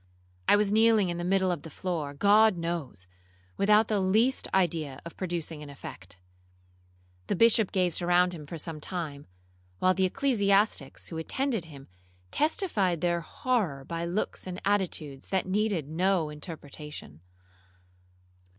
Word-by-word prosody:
I - - +7
was 205 -1 +2
kneeling 220 -3 +4
in 175 0 -3
the - - -3
middle 190 0 +2
of 170 -5 -3
the 160 - -9
floor, 155 -3 -4
God 205 +4 +5
knows, 165 - -4 0.5
without 210 +2 +4
the 210 -2 +1
least 220 +8 +2
idea 160 -7 0
of 170 - -9
producing 170 -4 -4
an 150 - -9
effect. 95 -10 -10 1.1
The - - 0
Bishop 225 0 +4
gazed 180 -2 +1
around 180 +1 +3
him 150 -4 -9
for 165 - -6
some 160 -1 -6
time, 155 -5 -5 0.5
while 185 - +3
the 190 0 +2
ecclesiastics 205 - +1
who 160 - -5
attended 230 - -1
him 140 -4 -12 0.4
testified 220 - +1
their 175 -1 +1
horror 175 - -1
by 170 +2 -3
looks 180 +2 -3
and 180 0 -5
attitudes 175 -9 -1
that 190 -1 0
needed 190 -5 0
no 175 0 +1
interpretation. 150 - -8
180 Hz, 140 wpm, -28 LUFS, 155-200 Hz, 1.1 s, I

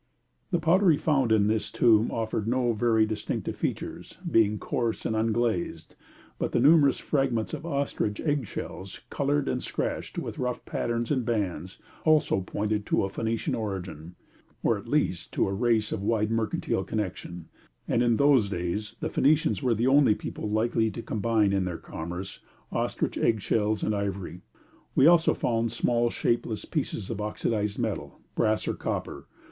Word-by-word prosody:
The 175 - +2
pottery 170 0 +4
found 135 -7 +1
in 105 -2 +4
this 110 0 0
tomb 115 -2 +4
offered 110 -1 -2
no 120 0 +1
very 110 0 +3
distinctive 110 -1 -3
features, - - -4
being 105 -2 +3
coarse 115 +1 -2
and 110 - 0
unglazed, 110 -7 -1 0.5
but - - -2
the - - +3
numerous 140 +1 +5
fragments 130 -6 0
of 165 - -5
ostrich 140 -8 -1
egg 145 -6 0
shells, 95 +1 -7
coloured 145 0 0
and 125 - -1
scratched - - -3
with - - -4
rough 125 -1 -2
patterns 120 +1 -2
in 135 -3 +2
bands, 95 -6 -2 0.3
also 155 -10 +3
pointed 105 +3 -2
to - - +2
a 95 - -1
Phoenician 115 +3 -2
origin, 95 -6 -5 0.5
or - - +3
at - - -8
least - - 0
to - - +1
a 95 - -2
race 115 0 +1
of 95 - -2
wide 105 +1 +1
mercantile 115 -1 -1
connection: 90 -5 -4 0.4
and 120 - +2
in 120 -2 +3
those 140 -7 +4
days 90 +3 -3
the - - -1
Phoenicians 150 +2 +2
were 125 -4 +2
the 115 +3 0
only 135 -4 +5
people 105 - -5
likely 110 +1 +1
to 115 +2 -7
combine 110 -2 +1
in 95 -1 +1
their 90 -2 -3
commerce 90 +4 -7 0.3
ostrich - - -1
egg 110 -2 +2
shells 105 0 0
and 110 - +1
ivory. 100 -4 -3 0.5
We 135 - +5
also 170 0 +5
found 115 -1 0
small 120 -1 +1
shapeless 115 -2 -1
pieces 125 - -3
of 105 -2 -4
oxidised 105 0 -1
metal, - - -3
brass 110 -1 +1
or - - +1
copper. - - -4
110 Hz, 165 wpm, -27 LUFS, 105-125 Hz, 0.5 s, numerous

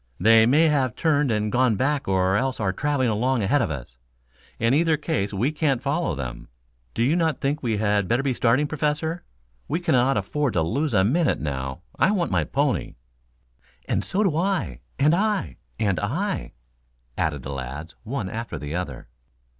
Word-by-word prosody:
"They 110 +4 +6
may 145 +6 +5
have 135 -5 +1
turned 150 -4 +2
and 105 -1 0
gone 125 -2 +3
back 140 +5 0
or 95 0 +2
else 130 +3 0
are 100 -3 0
traveling 140 +1 0
along 120 +2 +1
ahead 135 +9 +2
of 120 - 0
us. 65 -4 -7 0.6
In 115 +2 +2
either 160 +1 +3
case 150 - -2
we 110 +8 0
can't 150 -5 +1
follow 140 - -1
them. 65 -3 -6 0.5
Do 115 - +1
you 140 +7 +3
not 165 -3 +1
think 145 +2 -1
we 115 -4 0
had 105 -2 +1
better 120 +7 +1
be 135 -2 +1
starting, 125 +4 +2
Professor? 155 +3 -2 0.4
We 160 +5 -1
cannot 130 -7 +2
afford 130 +7 -1
to 80 - +2
lose 135 - -1
a 95 - +5
minute 150 - +2
now. 70 +1 -4 0.2
I - - +4
want 185 - 0
my 85 -5 +1
pony." - - -1 0.9
"And - - 0
so 200 +3 0
do 180 -7 +1
I 165 - -1 0.2
and 150 +3 +4
I 200 - 0 0.2
and 100 -4 0
I," 180 - -2 0.6
added 75 -4 -1
the 70 - -5
lads, 70 +5 -6
one 115 -3 -4
after 115 +4 -5
the 75 +1 -6
other. 75 -11 -5
125 Hz, 180 wpm, -24 LUFS, 95-150 Hz, 0.9 s, They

